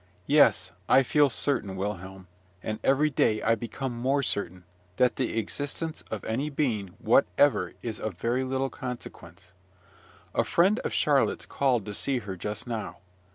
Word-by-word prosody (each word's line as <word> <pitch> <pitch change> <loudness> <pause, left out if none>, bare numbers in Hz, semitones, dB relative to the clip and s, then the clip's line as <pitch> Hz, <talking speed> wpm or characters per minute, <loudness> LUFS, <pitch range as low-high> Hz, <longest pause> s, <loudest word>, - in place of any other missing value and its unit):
Yes, - - +4 0.2
I 135 - +6
feel 145 +2 +4
certain, 110 -5 -1
Wilhelm, 95 -1 -5 0.4
and 110 0 -3
every 150 +3 +3
day 110 -5 +2
I 115 - +4
become 120 +3 -4
more 135 +4 +1
certain, 90 -6 -2 0.3
that 125 -1 +2
the 125 -3 -1
existence 145 +8 -3
of 110 - -4
any 130 +7 -2
being 110 -11 -1
whatever 140 +11 +3
is 115 -3 -4
of 110 -4 -4
very 120 +6 0
little 130 +1 -1
consequence. 125 -7 -8 0.8
A - - +2
friend 195 +7 +3
of - - -3
Charlotte's - - +2
called 125 -6 +1
to 105 - -5
see 135 +6 0
her 100 -5 -5
just 105 +4 -5
now. 115 -3 -4
120 Hz, 155 wpm, -27 LUFS, 105-135 Hz, 0.8 s, I